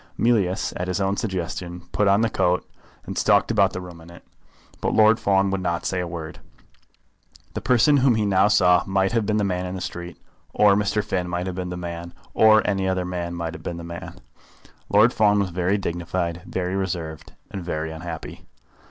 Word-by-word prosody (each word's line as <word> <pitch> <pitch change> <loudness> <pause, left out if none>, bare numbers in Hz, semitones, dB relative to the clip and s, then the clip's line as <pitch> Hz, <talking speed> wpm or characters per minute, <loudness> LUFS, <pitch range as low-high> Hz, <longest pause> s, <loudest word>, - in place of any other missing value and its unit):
Mealyus, 105 -6 +1
at 90 - -3
his 90 0 -1
own 95 0 0
suggestion, 90 -3 -4
put 105 - +1
on 100 +2 +4
the 115 - +2
coat, 90 +1 +1 0.4
and - - -6
stalked - - +3
about - - +3
the - - -5
room 90 -2 -10
in 80 - -14
it. 85 - -14 0.6
But - - 0
Lord 110 +1 +5
Fawn 95 -1 +2
would 95 -1 -1
not 85 -2 -2
say 95 - -1
a 90 - -2
word. 80 -2 -7 1.1
The - - -4
person 125 +4 +4
whom 130 -3 +4
he 110 -1 0
now 100 0 +4
saw 90 -4 +4
might 95 +1 +1
have 115 -3 0
been 105 -1 +1
the 105 - +1
man 90 -2 -1
in 90 - -5
the - - -5
street, 85 -1 -6 0.4
or 105 -1 +5
Mr. 105 +1 +1
Finn 90 -4 -2
might 90 +1 -2
have 95 - -3
been 90 -1 -4
the 90 - -5
man, 85 -1 -7 0.2
or 110 -1 +5
any 95 -2 0
other 95 -1 -1
man 85 -1 -4
might 85 -1 -4
have - - -9
been 85 - -5
the 85 - -7
man. 85 0 -8 0.7
Lord 110 +4 +5
Fawn 105 -1 +3
was 100 -3 0
very 90 +3 0
dignified, 85 -1 -3
very 90 0 -2
reserved, 85 -5 -4 0.2
and 95 -3 -5
very 80 -2 -3
unhappy. 80 0 -8
90 Hz, 205 wpm, -23 LUFS, 85-100 Hz, 1.1 s, Lord